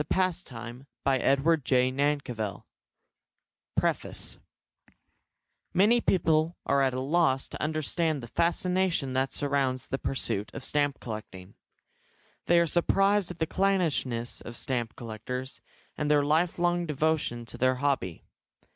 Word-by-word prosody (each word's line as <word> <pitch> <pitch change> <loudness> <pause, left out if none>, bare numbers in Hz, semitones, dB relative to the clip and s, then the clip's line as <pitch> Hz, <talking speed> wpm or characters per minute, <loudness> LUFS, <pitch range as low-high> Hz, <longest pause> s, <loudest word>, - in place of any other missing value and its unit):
New - - +1
York 190 - +5 0.2
167, 120 +1 -9 0.6
BROADWAY 130 -6 +3
1902 130 -8 -1 1.1
PREFACE - - -1 1.4
Many 220 +6 +5
people 165 -3 +2
are 140 0 +3
at 130 -2 +2
a - - -1
loss 135 -1 +2
to - - -7
understand 155 -1 0
the - - -7
fascination 170 0 0
that 130 +1 +1
surrounds 135 -3 -1
the 135 - -2
pursuit 105 -6 -2
of - - -6
stamp 145 0 0
collecting. 105 -4 -8 0.9
They 175 0 +5
are 170 - +4
surprised 195 +4 +2
at 180 - -7
the 160 - 0
clannishness 160 -11 0
of 120 - -8
stamp 120 -2 -2
collectors, 125 +3 -6 0.3
and 150 -1 -2
their 145 -1 +4
lifelong 175 +2 +1
devotion 150 -5 0
to - - -10
their 130 +1 +3
hobby. 130 - -1
140 Hz, 125 wpm, -28 LUFS, 125-170 Hz, 1.4 s, York